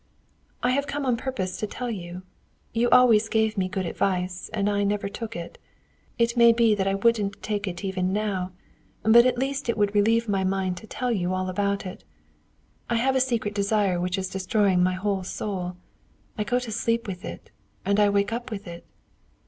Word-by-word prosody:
"I 250 - +3
have 280 +2 0
come 285 0 -3
on 250 -2 +2
purpose 230 -8 -3
to 215 - -3
tell 245 +3 -4
you. 180 -3 -6 0.5
You 235 +2 +2
always 230 -3 +6
gave 220 -1 +1
me 185 -2 0
good 190 -1 -2
advice, 180 +1 -1
and 205 -2 0
I 205 0 +1
never 200 0 0
took 225 +2 -6
it. 170 0 -7 0.6
It 235 0 +2
may 235 -1 +7
be 230 -2 +4
that 195 -2 0
I 195 - +1
wouldn't 205 -1 +1
take 205 -1 -2
it 175 +1 -5
even 185 -1 -1
now; 195 -3 -1 0.5
but 235 +3 +7
at 250 -1 0
least 270 0 -2
it 235 - +1
would 205 -1 +2
relieve 225 +3 +3
my 195 -2 +1
mind 190 -1 -1
to 220 - -10
tell 250 +2 -2
you 185 -4 0
all 185 0 -2
about 200 +2 -1
it. 185 - -8 0.9
I 235 - +1
have 260 +3 +2
a 260 - +4
secret 235 -5 0
desire 200 -3 +1
which 180 +2 -1
is 190 0 -2
destroying 190 0 +1
my 185 +1 +3
whole 195 +1 -1
soul: 180 -1 -4 0.6
I 210 - -2
go 245 - +1
to 250 -2 -4
sleep 230 +2 0
with 185 -2 -6
it, - - -8 0.3
and 200 +1 +2
I 205 -1 +5
wake 200 +2 +1
up 240 +2 -4
with 205 -3 -6
it." 170 0 -9
205 Hz, 205 wpm, -25 LUFS, 190-230 Hz, 0.9 s, may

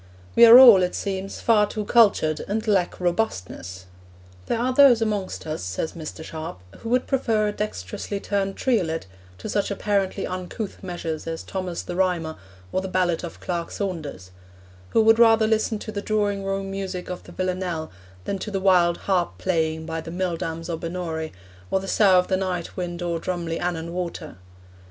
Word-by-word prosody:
We 235 - +9
are 230 +2 +11
all, 240 -7 +10
it 180 0 0
seems, 195 0 -4
far 210 -3 +4
too 210 0 -4
cultured, 200 -9 +3
and 220 +3 -2
lack 190 -4 +1
robustness. 95 - -2 0.6
'There - - 0
are 250 +2 0
those 260 -3 +7
amongst 210 -4 -2
us,' 155 0 -4
says 90 - -3
Mr. 160 -1 -7
Sharp, 160 - -7 0.2
'who 225 - -6
would 250 +1 +2
prefer 225 -6 +1
a - - 0
dexterously 200 - -4
turned 195 -1 -1
triolet 180 -11 0 0.3
to 90 - -7
such 205 -1 0
apparently 200 -1 -1
uncouth 185 +3 -5
measures 170 -4 -5
as 165 0 -4
Thomas 185 -3 -4
the 175 - -6
Rhymer, 175 -4 0 0.4
or - - 0
the 190 - -4
ballad 180 -2 0
of 170 - -7
Clerk 170 -2 -3
Saunders: 155 - -5 0.6
who 225 - +3
would 225 +1 +5
rather 225 -1 +6
listen 220 0 +1
to 215 - -7
the 200 -1 -4
drawing 205 -2 0
room 195 0 -3
music 190 -2 -5
of 180 - -6
the - - -13
Villanelle 180 -3 -3 0.3
than 195 - -2
to 210 - -5
the 195 -2 -2
wild 180 -3 +4
harp 185 -3 0
playing 160 -3 -1
by 165 0 -4
the 165 - -9
mill 180 0 -2
dams 165 0 -5
o' 165 -2 -3
Binnorie, 165 -2 -4 0.4
or - - +1
the 195 - -7
sough 195 -2 +5
of 180 - +3
the 190 - +1
night 180 -3 -3
wind 175 -1 -4
o'er 170 -1 -1
drumly 170 -2 -3
Annan 170 -1 -3
water.' 175 - -5
185 Hz, 185 wpm, -24 LUFS, 165-205 Hz, 0.6 s, are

